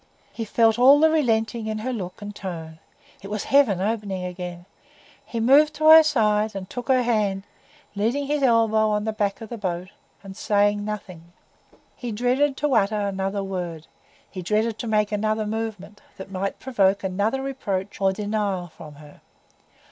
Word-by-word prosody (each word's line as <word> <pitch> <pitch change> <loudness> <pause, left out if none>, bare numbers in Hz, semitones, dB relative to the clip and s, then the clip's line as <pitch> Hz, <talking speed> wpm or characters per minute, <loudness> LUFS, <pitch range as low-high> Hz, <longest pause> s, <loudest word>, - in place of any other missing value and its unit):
He 225 - -4
felt 225 +1 +2
all 275 +4 +7
the 315 +1 +5
relenting 225 -6 0
in 215 0 -2
her 250 +4 -3
look 185 -3 -6
and 205 0 -7
tone; 160 -5 -7 0.4
it 195 - -9
was 210 0 -3
heaven 265 -10 +3
opening 200 -2 -2
again. 180 -1 -7 0.6
He 230 - -5
moved 290 +6 +4
to 310 +1 +3
her 320 0 +11
side, 215 -8 +1
and 190 -1 -6
took 245 +4 -7
her 260 -2 +3
hand, 210 -5 0 0.5
leaning 230 +8 -1
his 295 +1 -1
elbow 225 -4 +3
on 210 0 0
the 220 0 -2
back 205 -1 -2
of 225 - -8
the 235 - -7
boat, 180 -2 -3 0.3
and 195 -1 -10
saying 205 0 +1
nothing. 185 -5 -7 0.6
He 240 -2 -6
dreaded 255 +5 +1
to 295 -2 0
utter 210 -1 +2
another 195 0 -2
word, 175 -4 -5 0.4
he 185 - -8
dreaded 215 +4 -1
to 240 - -4
make 210 -1 +1
another 215 +1 -1
movement, 215 -2 -5 0.2
that 190 0 -9
might 195 +1 -3
provoke 200 -7 +1
another 205 +8 -1
reproach 200 -8 -4
or 195 0 +3
denial 205 -3 -2
from 150 -1 -13
her. 150 0 -16
210 Hz, 170 wpm, -23 LUFS, 195-230 Hz, 0.6 s, her